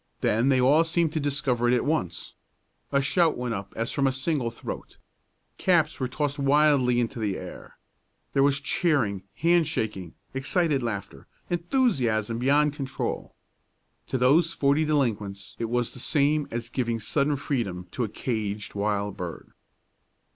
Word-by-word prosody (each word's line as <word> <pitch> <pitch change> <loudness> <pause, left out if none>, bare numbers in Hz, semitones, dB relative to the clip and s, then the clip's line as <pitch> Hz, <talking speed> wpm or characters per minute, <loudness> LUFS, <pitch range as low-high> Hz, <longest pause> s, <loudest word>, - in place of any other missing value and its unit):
Then 115 +5 +2
they 130 -2 +4
all 140 +6 +5
seemed 165 -1 +1
to 155 - 0
discover 140 -4 0
it 125 - +4
at 125 - 0
once. 140 - -2 0.6
A 140 -1 +2
shout 165 +2 +2
went 125 -1 -2
up 100 -2 -5
as 115 +1 -2
from 140 -1 +1
a - - +2
single 130 -1 -1
throat. 115 - -8 0.6
Caps 170 -4 +2
were 130 - 0
tossed 145 +2 -2
wildly 140 -3 +4
into 120 0 -2
the 105 -4 -1
air. - - -10 0.6
There 135 - +3
was 140 0 +3
cheering, 140 - +1
hand 170 -1 +3
shaking, 105 - -3 0.2
excited 145 +2 +1
laughter, 100 - -5 0.2
enthusiasm 140 - +1
beyond 145 +3 +3
control. 135 -3 -4 0.7
To 130 - -1
those 150 +7 +4
forty 140 +3 +2
delinquents 110 -9 -1
it 115 - -1
was 120 0 0
the - - -11
same 145 +3 +2
as 120 0 -4
giving 120 -2 -1
sudden 140 +6 +1
freedom 110 -11 -3
to 125 - -2
a 110 - -2
caged 105 -2 -3
wild 100 -1 -1
bird. 85 -3 -7
130 Hz, 155 wpm, -26 LUFS, 110-150 Hz, 0.7 s, all